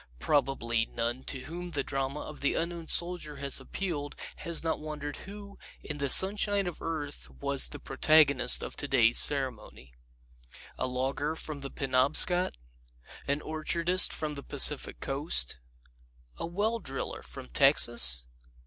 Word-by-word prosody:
Probably 120 Hz, -, -1 dB
none 120 Hz, +2 st, -4 dB
to 135 Hz, -, -6 dB
whom 175 Hz, +5 st, -8 dB
the 145 Hz, -5 st, -3 dB
drama 135 Hz, +2 st, -4 dB
of 155 Hz, -, -10 dB
the 140 Hz, -, 0 dB
Unknown 170 Hz, -1 st, -4 dB
Soldier 170 Hz, -4 st, -1 dB
has 140 Hz, -1 st, +1 dB
appealed 145 Hz, 0 st, -6 dB, 0.2 s
has 170 Hz, -3 st, +1 dB
not 160 Hz, -1 st, -2 dB
wondered 150 Hz, -1 st, -7 dB
who, 200 Hz, 0 st, -12 dB, 0.2 s
in 145 Hz, -1 st, -7 dB
the 140 Hz, -1 st, -2 dB
sunshine 200 Hz, +3 st, +6 dB
of 175 Hz, -3 st, -7 dB
earth, 145 Hz, -, -6 dB
was -, -, 0 dB
the -, -, -9 dB
protagonist 140 Hz, -5 st, +3 dB
of -, -, -7 dB
today's 120 Hz, -5 st, +2 dB
ceremony. 125 Hz, -, 0 dB, 0.8 s
A -, -, -3 dB
logger 135 Hz, +4 st, -3 dB
from 155 Hz, -3 st, -7 dB
the 135 Hz, -, -7 dB
Penobscot? 135 Hz, -, +1 dB, 0.7 s
An 145 Hz, +1 st, -2 dB
orchardist 170 Hz, +3 st, +1 dB
from 155 Hz, -1 st, -4 dB
the 140 Hz, -, -8 dB
Pacific 145 Hz, 0 st, +1 dB
Coast? 135 Hz, -, -1 dB, 0.8 s
A -, -, -5 dB
well 210 Hz, +7 st, -2 dB
driller 135 Hz, -9 st, -6 dB
from -, -, -11 dB
Texas? -, -, +6 dB
145 Hz, 140 wpm, -28 LUFS, 130-170 Hz, 0.8 s, sunshine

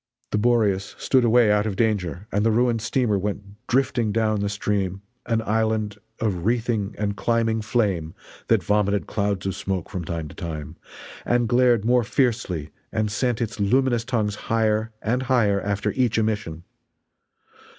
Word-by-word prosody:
The 105 Hz, -, +1 dB
Boreas 105 Hz, -4 st, +1 dB
stood 130 Hz, -2 st, +2 dB
away 115 Hz, -2 st, +5 dB
out 105 Hz, +1 st, +2 dB
of 100 Hz, -, -2 dB
danger, 100 Hz, -5 st, -1 dB
and 105 Hz, +1 st, +1 dB
the 115 Hz, -, +3 dB
ruined 115 Hz, 0 st, +2 dB
steamer 115 Hz, -2 st, +1 dB
went 100 Hz, +3 st, -6 dB
drifting 125 Hz, -4 st, +1 dB
down 110 Hz, -1 st, +1 dB
the 100 Hz, 0 st, -1 dB
stream 100 Hz, -2 st, -2 dB, 0.2 s
an 115 Hz, -2 st, +1 dB
island 110 Hz, -1 st, 0 dB, 0.2 s
of 95 Hz, -6 st, -1 dB
wreathing 115 Hz, -2 st, 0 dB
and 100 Hz, -1 st, -1 dB
climbing 115 Hz, -1 st, +1 dB
flame 100 Hz, -8 st, -1 dB, 0.3 s
that 110 Hz, -5 st, +3 dB
vomited 105 Hz, +1 st, +1 dB
clouds 100 Hz, -3 st, -1 dB
of 95 Hz, -, -1 dB
smoke 95 Hz, -3 st, -4 dB
from 90 Hz, -, -4 dB
time 80 Hz, -2 st, -4 dB
to -, -, -11 dB
time, 80 Hz, -5 st, -6 dB, 0.5 s
and 120 Hz, -1 st, +1 dB
glared 120 Hz, -2 st, +3 dB
more 125 Hz, +1 st, +4 dB
fiercely 110 Hz, -, -1 dB, 0.2 s
and 110 Hz, -1 st, -1 dB
sent 120 Hz, +3 st, 0 dB
its 110 Hz, -2 st, -6 dB
luminous 120 Hz, +3 st, +2 dB
tongues 115 Hz, -4 st, -1 dB, 0.2 s
higher 110 Hz, 0 st, +1 dB
and 125 Hz, +4 st, 0 dB
higher 105 Hz, -6 st, +3 dB
after 100 Hz, 0 st, -1 dB
each 125 Hz, -4 st, +1 dB
emission. 105 Hz, -7 st, -1 dB
110 Hz, 160 wpm, -24 LUFS, 100-115 Hz, 0.5 s, away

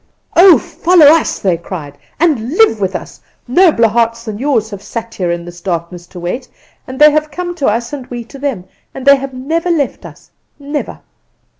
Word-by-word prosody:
"'Oh, 360 Hz, 0 st, +8 dB
follow 350 Hz, -3 st, +3 dB
us,' 315 Hz, +3 st, +4 dB
they 185 Hz, -4 st, 0 dB
cried, 160 Hz, -4 st, -8 dB, 0.2 s
'and 290 Hz, -6 st, +1 dB
live 430 Hz, -, +4 dB
with 190 Hz, 0 st, -1 dB
us. -, -, -7 dB, 0.3 s
Nobler 285 Hz, -4 st, +4 dB
hearts 230 Hz, +1 st, 0 dB
than 215 Hz, -2 st, -6 dB
yours 235 Hz, -5 st, 0 dB
have 200 Hz, -1 st, -7 dB
sat 230 Hz, +2 st, -6 dB
here 180 Hz, -2 st, -2 dB
in 170 Hz, 0 st, -3 dB
this 175 Hz, 0 st, -11 dB
darkness 175 Hz, -1 st, -4 dB
to 180 Hz, -, -11 dB
wait, 175 Hz, +10 st, -4 dB, 0.4 s
and 260 Hz, -, -7 dB
they 300 Hz, +1 st, +7 dB
have 305 Hz, 0 st, 0 dB
come 350 Hz, +3 st, -5 dB
to 285 Hz, -, 0 dB
us 235 Hz, +4 st, -1 dB
and 265 Hz, -3 st, -6 dB
we 240 Hz, -1 st, -6 dB
to 270 Hz, +4 st, -13 dB
them; 265 Hz, -10 st, -3 dB, 0.3 s
and 265 Hz, -, -7 dB
they 280 Hz, 0 st, +7 dB
have 270 Hz, -1 st, -7 dB
never 320 Hz, +7 st, -2 dB
left 305 Hz, -6 st, -1 dB
us, -, -, -14 dB, 0.3 s
never. 290 Hz, +1 st, -5 dB
245 Hz, 195 wpm, -14 LUFS, 200-295 Hz, 0.4 s, Oh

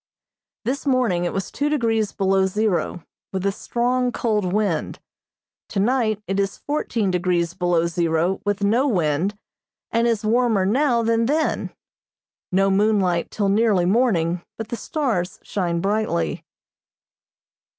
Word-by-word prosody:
This 275 Hz, +4 st, -2 dB
morning 235 Hz, -10 st, +2 dB
it -, -, -1 dB
was 195 Hz, -1 st, -4 dB
two 290 Hz, +1 st, -1 dB
degrees 225 Hz, -7 st, +1 dB
below 190 Hz, 0 st, +2 dB
zero, 190 Hz, -4 st, -1 dB, 0.3 s
with 190 Hz, 0 st, -3 dB
a 200 Hz, -, +2 dB
strong, 245 Hz, +4 st, 0 dB
cold 210 Hz, -6 st, 0 dB
wind; 200 Hz, -6 st, -1 dB, 0.7 s
tonight 215 Hz, 0 st, +1 dB
it 195 Hz, +1 st, -1 dB
is 195 Hz, -1 st, -1 dB
fourteen 235 Hz, -9 st, -1 dB
degrees 175 Hz, -1 st, 0 dB
below 175 Hz, -2 st, +1 dB
zero 170 Hz, +1 st, 0 dB
with 205 Hz, 0 st, -1 dB
no 235 Hz, +7 st, +3 dB
wind, 180 Hz, -, 0 dB, 0.5 s
and 230 Hz, +1 st, +2 dB
is 225 Hz, -2 st, 0 dB
warmer 225 Hz, -3 st, +2 dB
now 240 Hz, +2 st, +2 dB
than 230 Hz, 0 st, +2 dB
then. 310 Hz, +3 st, 0 dB, 0.8 s
No 195 Hz, +1 st, +3 dB
moonlight 195 Hz, -4 st, +2 dB
till 200 Hz, -2 st, -1 dB
nearly 205 Hz, -3 st, +3 dB
morning, 180 Hz, -5 st, +2 dB, 0.2 s
but 225 Hz, -1 st, -6 dB
the 235 Hz, -, -2 dB
stars 230 Hz, -, -2 dB
shine 170 Hz, -4 st, -2 dB
brightly. 195 Hz, -, -1 dB
205 Hz, 130 wpm, -22 LUFS, 180-230 Hz, 0.8 s, no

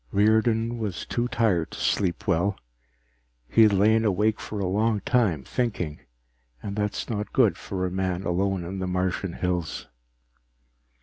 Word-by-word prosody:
_ -, -, -46 dB
Riordan 110 Hz, +3 st, +2 dB
was 105 Hz, -6 st, -3 dB
too 120 Hz, 0 st, -1 dB
tired 110 Hz, -9 st, +1 dB
to -, -, -9 dB
sleep 90 Hz, -4 st, 0 dB
well. 95 Hz, +5 st, +1 dB, 0.9 s
He 115 Hz, -, +3 dB
had 110 Hz, -1 st, +7 dB
lain 110 Hz, +3 st, +4 dB
awake 105 Hz, +1 st, +1 dB
for 105 Hz, -, -5 dB
a 100 Hz, -, -1 dB
long 105 Hz, +3 st, +1 dB
time, 100 Hz, -, +1 dB
thinking, 95 Hz, -, -2 dB, 0.6 s
and 100 Hz, -, -4 dB
that 105 Hz, -1 st, -1 dB
is -, -, -4 dB
not 105 Hz, -2 st, -3 dB
good 120 Hz, -6 st, +4 dB
for 95 Hz, -2 st, -4 dB
a 90 Hz, -, -2 dB
man 95 Hz, 0 st, -2 dB
alone 95 Hz, +1 st, 0 dB
in 95 Hz, +3 st, -5 dB
the 95 Hz, -, -2 dB
Martian 90 Hz, 0 st, -1 dB
hills. 90 Hz, -3 st, -3 dB
100 Hz, 165 wpm, -26 LUFS, 90-110 Hz, 0.9 s, had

